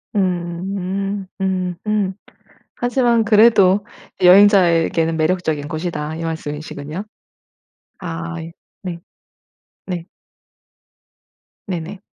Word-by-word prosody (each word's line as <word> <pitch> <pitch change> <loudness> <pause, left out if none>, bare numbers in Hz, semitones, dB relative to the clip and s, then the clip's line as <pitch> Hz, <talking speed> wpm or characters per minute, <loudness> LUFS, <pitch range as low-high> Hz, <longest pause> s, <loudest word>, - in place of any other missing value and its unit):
음음. 190 +2 -2
음. 185 -2 -1
음. 205 -3 +1 0.6
하지만 245 -2 +2
그래도 210 -3 +5 0.4
"여행자에게는 180 -4 +5
매력적인 155 -3 0
곳이다." 155 -1 -4
이 165 - -5
말씀이시군요. 150 +2 -5 1.0
아 170 -1 -5
예. 165 +1 -8 0.3
네. 175 -2 -5 0.9
네. 180 -3 -4 1.6
네네. 185 +1 -5
180 Hz, 180 characters per minute, -19 LUFS, 165-195 Hz, 1.6 s, 그래도